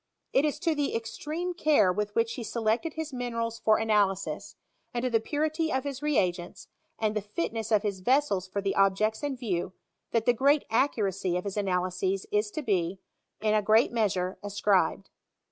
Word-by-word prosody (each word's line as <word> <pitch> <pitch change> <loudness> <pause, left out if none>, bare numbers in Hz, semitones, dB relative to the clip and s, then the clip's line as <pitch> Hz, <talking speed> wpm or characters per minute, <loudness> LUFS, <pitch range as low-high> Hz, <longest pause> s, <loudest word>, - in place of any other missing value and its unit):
It 275 - +4
is 300 -1 0
to 330 - +2
the 290 -5 -1
extreme 300 +11 -3
care 290 - +3
with 210 +1 -3
which 230 0 +1
he 245 - -5
selected 235 +8 -1
his 315 -3 -4
minerals 230 -2 -3
for 215 -1 +4
analysis, 200 -4 0 0.4
and 240 - -1
to 255 - 0
the 225 - +4
purity 310 +6 -1
of 265 - 0
his 280 -1 -5
reagents, 180 -12 -1 0.3
and 215 -1 0
the 210 - 0
fitness 210 +3 -3
of 215 -1 +4
his 200 -3 -2
vessels 205 -4 +1
for 200 +2 -3
the 195 - 0
objects 200 +3 +2
in 285 -3 -2
view, 185 -7 -2 0.4
that 230 -1 0
the 245 - +5
great 280 +5 +3
accuracy 195 -8 +1
of 180 - -3
his 200 -1 -4
ana 195 -3 +1
lyses 185 +1 -2
is 210 0 +1
to 305 +8 -5
be, 190 -5 0 0.4
in 215 -1 +2
a 215 - +3
great 220 +3 +4
measure, 195 -5 0
ascribed. 205 -1 +1
220 Hz, 185 wpm, -28 LUFS, 195-260 Hz, 0.4 s, the